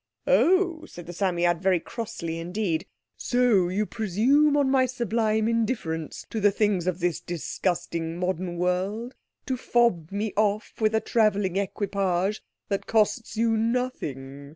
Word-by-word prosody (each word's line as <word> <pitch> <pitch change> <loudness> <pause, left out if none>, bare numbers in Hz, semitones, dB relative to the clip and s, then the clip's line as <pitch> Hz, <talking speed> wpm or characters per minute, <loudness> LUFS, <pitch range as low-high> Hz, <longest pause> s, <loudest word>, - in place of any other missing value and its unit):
"Oh," 355 -2 +3
said 175 - -10
the 175 - -8
Psammead 175 -2 +1
very 190 -2 +3
crossly 170 -5 -5
indeed, 175 -1 -2 0.3
"so 240 -8 +2
you 205 +4 0
presume 245 +10 +2
on 285 -2 +3
my 265 -1 +3
sublime 225 -3 0
indifference 220 -9 -2
to 225 - -2
the 205 0 +5
things 200 -3 0
of 180 -1 -1
this 175 -1 0
disgusting 170 -1 -3
modern 180 -1 -2
world, 190 +7 -1 0.3
to 260 - -1
fob 235 -10 +1
me 205 +1 -2
off 210 0 0
with 215 0 +3
a 220 - +2
travelling 205 -5 +1
equipage 195 0 -1 0.3
that 200 -1 -2
costs 220 +1 +1
you 225 0 +2
nothing. 150 - -3
205 Hz, 140 wpm, -26 LUFS, 175-230 Hz, 0.3 s, the